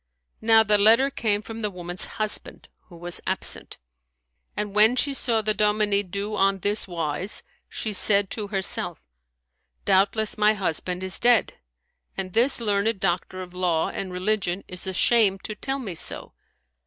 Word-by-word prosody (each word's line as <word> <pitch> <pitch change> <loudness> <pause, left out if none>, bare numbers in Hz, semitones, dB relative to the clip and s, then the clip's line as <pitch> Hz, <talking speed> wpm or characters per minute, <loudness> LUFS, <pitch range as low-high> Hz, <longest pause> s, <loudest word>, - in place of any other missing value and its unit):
Now 225 0 +5
the 210 -1 +3
letter 230 +7 +5
came 210 -5 -1
from 225 +1 -8
the 210 - -1
woman's 175 -1 -3
husband, 215 -1 -3 0.2
who 175 - -15
was 175 +1 -1
absent; - - -2 0.8
and 210 -1 -3
when 215 +4 +5
she 280 +2 0
saw 230 -4 -1
the 215 0 +1
dominie 210 -1 +1
do 200 +2 -5
on 195 -1 +2
this 205 +3 -1
wise, 170 +2 -2 0.3
she 215 - -3
said 200 0 +4
to 210 -2 -4
herself, 195 -2 +1 0.8
"Doubtless 210 +3 +1
my 210 0 +4
husband 180 -1 -2
is 190 0 +1
dead, 240 -2 +3 0.6
and 185 -2 -5
this 245 +4 +3
learned 210 -1 0
doctor 185 0 -2
of 180 -1 -13
law 180 -3 0
and 190 -1 -6
religion 185 0 -1
is 180 +1 -9
ashamed 195 +1 +2
to 215 - -4
tell 270 +5 -4
me 225 -9 -6
so." 160 - -4
205 Hz, 155 wpm, -24 LUFS, 185-220 Hz, 0.8 s, Now